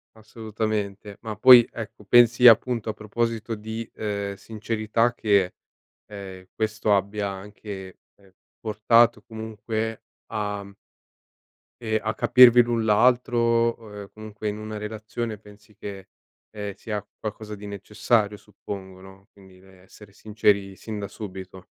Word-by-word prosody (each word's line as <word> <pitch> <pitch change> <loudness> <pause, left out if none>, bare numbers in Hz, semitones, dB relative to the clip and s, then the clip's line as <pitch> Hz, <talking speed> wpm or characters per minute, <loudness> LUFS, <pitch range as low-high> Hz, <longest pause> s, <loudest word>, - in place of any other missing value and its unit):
Assolutamente. 110 -2 -4
Ma 110 -2 -5
poi, 120 +2 +8
ecco, 105 -2 -8
pensi, 120 +2 +6
appunto, 115 0 +4
a - - -1
proposito 115 +2 -3
di, 110 +2 -6
ehm, 100 -2 -3
sincerità 110 +3 -1
che, 100 -6 +2 0.5
ehm, 95 -3 -10
questo 110 -1 +1
abbia 100 +1 -1
anche, 95 -1 -9 0.2
ehm, 95 -2 -24 0.3
portato, 110 +1 +3
comunque 110 0 -5 0.3
a 105 -2 -3 1.1
ehm, 110 -1 0
a 110 - -2
capirvi 125 0 +7
l'un 120 -1 -1
l'altro, 120 +3 +3
o 115 -3 0
e 100 - -13
comunque, 110 0 -8
in 105 - -5
una 110 0 -6
relazione, 110 +1 -5
pensi 105 0 -18
che, 100 -2 -8 0.4
ehm, 105 -2 -6
sia 105 0 -5
qualcosa 105 0 -6
di 105 0 -10
necessario, 105 +1 0
suppongo, 100 -2 -9
no, 95 +1 -15
quindi, 95 -2 -18
rhm, 95 -1 -19
essere 100 +1 -16
sinceri, 100 -2 0
sin 110 +2 -7
da 100 - -4
subito. 95 -3 -9
105 Hz, 130 wpm, -24 LUFS, 100-110 Hz, 1.1 s, poi